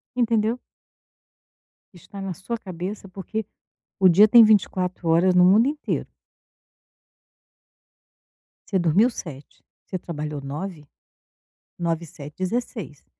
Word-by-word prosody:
Entendeu? 230 -1 +1 1.3
Está 195 +3 -12
na 195 -1 -4
sua 200 +7 -5
cabeça, 190 0 -7
porque 195 +3 -5 0.5
o 190 -1 +6
dia 200 +5 +7
tem 235 +1 +8
24 185 -4 +1
horas 175 +3 +3
no 180 - +6
mundo 210 +7 +5
inteiro. 295 +1 -3 2.6
Você 195 - +1
dormiu 185 +7 +3
7, 150 - -10 0.2
você 185 - -4
trabalhou 150 -4 -6
9, 150 +3 -6 0.9
9 170 -1 -2
e - - -10
7, 145 -1 -11
16, 190 - -4
185 Hz, 110 wpm, -23 LUFS, 165-215 Hz, 2.6 s, tem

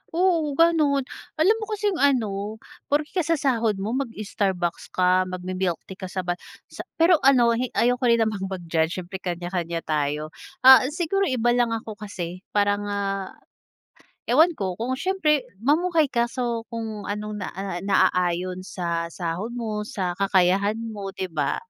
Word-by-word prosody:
Oo 335 -5 +2
ganun. 305 -4 +3 0.3
Alam 360 +9 +4
mo 430 - -4
kasi 420 -1 -1
yung 360 - -4
ano, 215 -7 +1 0.3
porke 295 +1 0
kakasahod 275 - +1
mo 195 +3 -3
mag-Starbucks 205 -8 -2
ka, 185 0 +3
magmi-milktea 185 0 -4
ka 185 - -5
sa 185 0 -4
ba 175 - -1 0.4
sa - - -8
pero 330 0 +5
ano 255 -4 +5
hi 240 +2 0
ayoko 245 +1 +2
rin 235 -1 +4
namang 205 -3 -2
mag-judge, 170 -3 -1
syempre 185 +1 -7
kanya-kanya 175 -2 -3
tayo. 150 0 -1 0.3
Ah, 260 0 +9
siguro 390 +4 0
iba 240 -2 +1
lang 240 -1 +2
ako 220 -1 -7
kasi, 185 -4 -6 0.2
parang, 205 0 +2
ah, 195 -1 -3 0.9
ewan 315 +8 +5
ko 190 - -3
kung, 240 +5 -2
syempre 315 -7 +1 0.2
mamuhay 315 0 +2
ka 235 -1 +1
so 235 -2 -3
kung 220 -3 -5
anong 210 0 -4
na 185 - -3
ah, 190 -2 -4
naaayon 180 -1 +1
sa 170 -3 -3
sahod 180 +7 -4
mo, 220 -3 -3
sa 190 -4 -3
kakayahan 195 +2 +3
mo, 220 -3 -6
'di 190 -2 -5
ba? 150 -3 0
210 Hz, 150 wpm, -24 LUFS, 185-260 Hz, 0.9 s, Ah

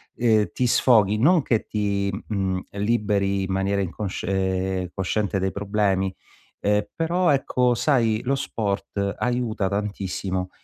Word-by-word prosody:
ehm, 110 -5 +2
ti 125 - 0
sfoghi, 110 -4 +4
non 165 +8 +4
che 115 -5 0
ti, 100 -2 -1 0.2
mhmm, 95 -3 -1
liberi 100 -2 0
in 95 - -3
maniera 95 +1 0
incosc 95 +2 -4
uhm, 95 -1 -1
cosciente 100 +1 -1
dai 95 0 0
problemi, 100 -1 0 0.5
uhm, 105 0 +1
però 175 +2 +1
ecco 125 -3 +2
sai 115 -4 +2
lo 135 +2 0
sport 100 -4 -2
aiuta 120 -5 0
tantissimo 95 -2 -3
100 Hz, 130 wpm, -24 LUFS, 95-115 Hz, 0.5 s, sfoghi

